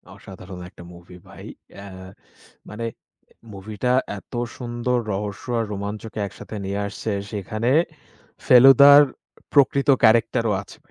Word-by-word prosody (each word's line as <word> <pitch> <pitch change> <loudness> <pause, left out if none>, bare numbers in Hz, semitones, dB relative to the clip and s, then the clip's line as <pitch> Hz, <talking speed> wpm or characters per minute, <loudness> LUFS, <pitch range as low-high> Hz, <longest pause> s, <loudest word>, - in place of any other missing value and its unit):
অসাধারণ 90 -1 -12
একটা 90 - -15
মুভি 90 +1 -15
ভাই। - - -13 0.3
অ্যা 100 - -11 0.8
মানে 110 +3 -6 0.7
মুভিটা 105 +5 -3 0.3
এত - - -24 0.2
সুন্দর 120 0 -2 0.2
রহস্য 105 +4 -5
আর 115 - -1
রোমাঞ্চকে 105 +2 -6
একসাথে 110 - -11
নিয়ে 100 +1 -3
আসছে, 110 - -5 0.2
সেখানে 110 +4 -3 0.7
ফেলুদার 135 +3 +8 0.5
প্রকৃত 140 0 +3
ক্যারেক্টারও 115 0 +3
আছে, - - -15
110 Hz, 110 wpm, -22 LUFS, 100-125 Hz, 0.8 s, ফেলুদার